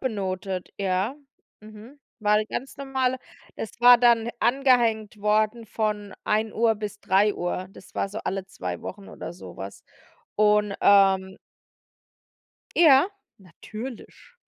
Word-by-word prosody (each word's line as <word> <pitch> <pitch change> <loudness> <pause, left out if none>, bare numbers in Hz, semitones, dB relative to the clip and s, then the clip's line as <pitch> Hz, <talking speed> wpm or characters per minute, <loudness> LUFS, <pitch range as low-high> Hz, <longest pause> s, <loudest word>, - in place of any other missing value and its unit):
benotet, 190 -5 -3
ja. 195 +5 -1 0.5
Mhm, 215 +6 -14 0.2
war 210 -1 +3
'ne 215 0 0
ganz 265 +4 -6
normale 265 -2 -1 0.4
es 225 +2 -8
war 245 0 +9
dann 235 -1 +3
angehängt 235 -5 +2
worden 215 +2 +1
von 210 -2 -3
13:00 220 +1 +1
bis 210 -1 -6
15:00, 190 -2 0
das - - -16
war - - -1
so 205 +2 -6
alle 195 0 -2
2 195 - -6
Wochen 200 +1 -8
oder 165 - -8
so 175 - -12
was 95 +1 -9 0.5
und, 210 -1 +3
ähm 190 -1 +4 1.4
Ja, 295 -3 +7 0.3
natürlich, 220 - -10
215 Hz, 120 wpm, -25 LUFS, 195-235 Hz, 1.4 s, war